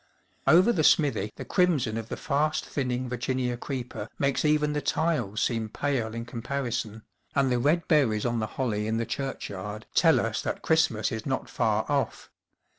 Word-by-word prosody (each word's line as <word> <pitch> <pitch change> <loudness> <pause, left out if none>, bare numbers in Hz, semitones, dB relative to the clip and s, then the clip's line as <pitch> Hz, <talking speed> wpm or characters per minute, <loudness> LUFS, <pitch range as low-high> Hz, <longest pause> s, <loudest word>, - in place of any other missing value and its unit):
Over 180 +11 +6
the 160 - +1
smithy 125 -10 +3
the - - -7
crimson 150 - +2
of 115 0 -5
the - - -4
fast 150 +2 0
thinning 125 -2 -2
Virginia 125 0 -1
creeper 125 0 -5
makes 140 -1 +1
even 150 -1 +2
the 150 - -1
tiles 135 -13 0
seem 115 -2 -1
pale 120 -3 -2
in 115 0 -4
comparison, 120 -3 -4 0.3
and 135 -2 +3
the 125 - +2
red 155 +6 +2
berries 125 -9 +3
on 120 -1 0
the 110 - -1
holly 110 -5 -1
in 110 +1 0
the 115 - -1
churchyard 105 -6 -5
tell - - +5
us - - -1
that - - -4
Christmas 160 -9 +2
is 110 +2 -4
not 130 -1 -2
far 110 -2 +1
off. 145 -2 -2
125 Hz, 175 wpm, -27 LUFS, 110-145 Hz, 0.3 s, Over